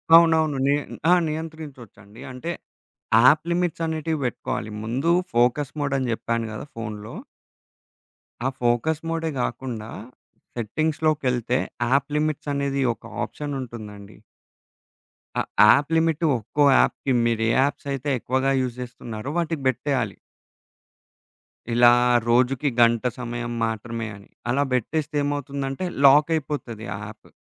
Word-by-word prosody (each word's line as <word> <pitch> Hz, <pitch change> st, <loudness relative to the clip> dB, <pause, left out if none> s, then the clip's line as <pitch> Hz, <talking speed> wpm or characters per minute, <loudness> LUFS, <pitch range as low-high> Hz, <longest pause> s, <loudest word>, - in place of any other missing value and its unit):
అవునవును. 160 Hz, -3 st, +5 dB
నీ 140 Hz, +1 st, +4 dB, 0.4 s
ఆ! -, -, +8 dB
నియంత్రించొచ్చండి. 150 Hz, -9 st, -8 dB
అంటే, 130 Hz, +7 st, -5 dB, 0.7 s
యాప్ 150 Hz, +4 st, +6 dB
లిమిట్సనేటివి 165 Hz, -2 st, -1 dB
బెట్టుకోవాలి, 110 Hz, -2 st, -3 dB
ముందూ 130 Hz, +9 st, 0 dB, 0.2 s
ఫోకస్ 125 Hz, +4 st, +2 dB
మోడని 135 Hz, -3 st, 0 dB
జెప్పాను 115 Hz, 0 st, -1 dB
గదా 110 Hz, -, -6 dB
ఫోన్లో. 105 Hz, -2 st, -6 dB, 1.3 s
ఆ -, -, +3 dB
ఫోకస్ 120 Hz, +6 st, +1 dB
మోడే 165 Hz, 0 st, -1 dB
గాకుండా, 120 Hz, -2 st, -4 dB, 0.7 s
సెట్టింగ్స్‌లోకెళ్తే 130 Hz, -1 st, 0 dB, 0.3 s
యాప్ 140 Hz, 0 st, +3 dB
లిమిట్సనేది 145 Hz, -2 st, -1 dB
ఒక -, -, -34 dB, 0.2 s
ఆప్షనుంటుందండి. 115 Hz, -8 st, -7 dB, 1.2 s
ఆ -, -, +3 dB, 0.3 s
యాప్ 145 Hz, +2 st, +1 dB
లిమిట్టు 165 Hz, 0 st, +1 dB
ఒక్కో 135 Hz, +7 st, 0 dB
యాప్‌కి, 135 Hz, -, +1 dB
మీరే 115 Hz, -1 st, +1 dB
యాప్సయితే 140 Hz, 0 st, -1 dB
ఎక్కువగా 130 Hz, +3 st, 0 dB
యూజ్ 125 Hz, -2 st, -3 dB
జేస్తున్నారో 120 Hz, -1 st, -7 dB
వాటికి 165 Hz, -3 st, -1 dB
బెట్టేయాలి. 130 Hz, -5 st, 0 dB, 1.6 s
ఇలా 120 Hz, 0 st, +7 dB, 0.4 s
రోజుకి 125 Hz, +4 st, +3 dB
గంట 115 Hz, -1 st, +4 dB, 0.2 s
సమయం 120 Hz, 0 st, -4 dB
మాత్రమే 115 Hz, +1 st, -4 dB
అని. 100 Hz, 0 st, -16 dB, 0.2 s
అలా 140 Hz, +3 st, +2 dB
బెట్టేస్తే 150 Hz, +4 st, -1 dB
ఏమవుతుందంటే, 140 Hz, +1 st, -3 dB, 0.2 s
లాకయిపోతది 145 Hz, -5 st, +2 dB
ఆ -, -, -5 dB
యాప్. 110 Hz, +1 st, -13 dB
135 Hz, 105 wpm, -24 LUFS, 120-150 Hz, 1.6 s, ఆ